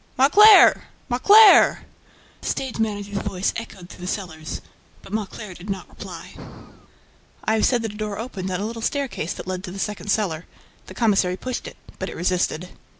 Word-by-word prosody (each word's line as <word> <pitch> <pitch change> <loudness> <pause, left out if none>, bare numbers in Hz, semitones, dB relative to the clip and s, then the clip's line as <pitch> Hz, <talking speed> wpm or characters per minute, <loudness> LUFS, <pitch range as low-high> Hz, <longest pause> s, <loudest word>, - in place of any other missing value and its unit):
"Mauclair! 400 - +7 0.2
Mauclair!" 405 - +6 0.6
The - - -7
stage 260 -4 -3
manager's 205 -2 -2
voice 185 +1 -2
echoed 200 -6 -8
through 180 - -13
the 180 - -2
cellars. 160 -6 -6 0.4
But 195 - -12
Mauclair 215 -1 -5
did 180 +3 -12
not 195 -1 -4
reply. - - -10 1.1
I 220 - +2
have 220 - +3
said 245 -3 +1
that 220 -2 -4
a - - -11
door 210 -2 -4
opened 200 -5 -5
on 180 -1 -2
a 205 - -3
little 230 +1 -6
staircase 265 - -2
that - - -9
led 185 0 -4
to 180 - -8
the 195 - -8
second 210 +1 -4
cellar. 180 -6 -1 0.4
The - - -11
commissary 195 -5 +1
pushed 255 +3 -5
it, - - -11 0.2
but - - -4
it - - -8
resisted. 180 0 -1
205 Hz, 180 wpm, -22 LUFS, 185-230 Hz, 1.1 s, Mauclair